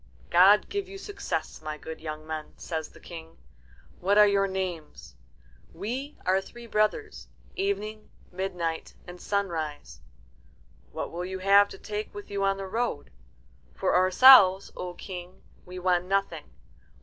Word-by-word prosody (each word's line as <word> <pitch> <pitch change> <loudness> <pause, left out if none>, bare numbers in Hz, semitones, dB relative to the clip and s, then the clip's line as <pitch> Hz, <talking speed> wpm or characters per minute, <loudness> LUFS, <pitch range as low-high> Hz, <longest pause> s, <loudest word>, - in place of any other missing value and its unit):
"God 195 +4 +6
give 405 -2 -4
you 390 - -8
success, 400 - -5
my 155 -1 -5
good 160 +1 -9
young 155 -1 -6
men," 155 -1 -6
says 160 -2 -5
the - - -17
King. 165 -1 -11 0.6
"What 200 +3 +2
are 210 - +9
your 200 -1 +2
names?" 180 - -5 0.6
"We 250 - -5
are 190 +1 +3
three 240 +4 -12
brothers 220 - -1 0.3
Evening, 220 - -3 0.2
Midnight, 180 -3 -4
and 180 0 -11
Sunrise." 160 - -3 0.9
"What - - -5
will 175 +1 -4
you 190 +1 -5
have 200 +2 +5
to - - -10
take 210 0 -6
with 205 0 -9
you 200 0 -1
on 195 0 +1
the 195 - -5
road?" 230 +5 -3 0.6
"For - - 0
ourselves, 190 +1 +7
O 180 -1 -6
King, 180 -1 -9 0.2
we 180 0 -8
want 180 -1 +1
nothing. 195 -4 -1
190 Hz, 145 wpm, -27 LUFS, 175-210 Hz, 0.9 s, are